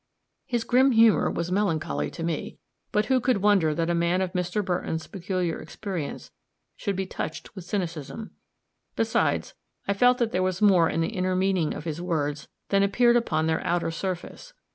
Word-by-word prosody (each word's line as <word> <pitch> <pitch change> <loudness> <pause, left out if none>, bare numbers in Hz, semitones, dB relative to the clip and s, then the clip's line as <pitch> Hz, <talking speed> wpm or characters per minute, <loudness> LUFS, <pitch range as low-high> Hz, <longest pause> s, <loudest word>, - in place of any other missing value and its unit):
His 240 -2 -1
grim 260 +3 +4
humor 225 -1 +5
was 170 +1 -3
melancholy 160 - 0
to - - -7
me 165 -2 -3 0.3
but 210 +1 +2
who 260 +1 +3
could 235 -5 +1
wonder 190 -7 +4
that 165 +1 0
a 175 - +1
man 170 +2 +1
of 190 -1 -2
Mr. 180 +3 -1
Burton's 175 -3 -2
peculiar 185 -3 -3
experience 180 -8 -6 0.4
should 200 -3 -3
be 190 +1 -2
touched 185 - -6
with 190 -3 -8
cynicism? 175 +1 -4 0.6
Besides, - - 0 0.3
I 200 - +2
felt 245 +5 +4
that 235 -3 0
there 185 - 0
was 185 0 0
more 185 -6 +5
in 165 - -1
the 165 - 0
inner 185 -3 -1
meaning 185 -4 +1
of - - -6
his 160 0 -4
words 150 -4 -2 0.2
than 200 0 +3
appeared 235 +5 +4
upon 160 -10 +1
their 160 0 0
outer 175 -1 0
surface. 185 - -5
185 Hz, 180 wpm, -26 LUFS, 165-210 Hz, 0.6 s, humor